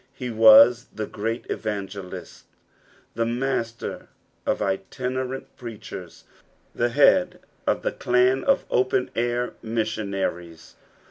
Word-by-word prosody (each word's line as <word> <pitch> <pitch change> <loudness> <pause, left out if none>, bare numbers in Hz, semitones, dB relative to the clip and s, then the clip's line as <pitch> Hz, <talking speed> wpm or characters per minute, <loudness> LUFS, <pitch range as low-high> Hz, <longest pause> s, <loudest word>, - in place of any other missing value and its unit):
He 125 -2 -5
was 115 +2 +7
the 110 - -4
gieat 115 +3 -4
evangelist; 100 -3 -6 0.7
the 115 - 0
muster 115 -1 -3 0.4
of - - +2
itinemnl 125 +7 -3
preachen; 110 -7 -8 0.6
the 120 - 0
head 180 +7 +4 0.3
of - - +1
the - - 0
clan 125 +2 +2
of 275 0 +2
open 125 0 +1
air 120 +1 -1
missionaries. 100 -7 -3
115 Hz, 105 wpm, -24 LUFS, 105-125 Hz, 0.7 s, was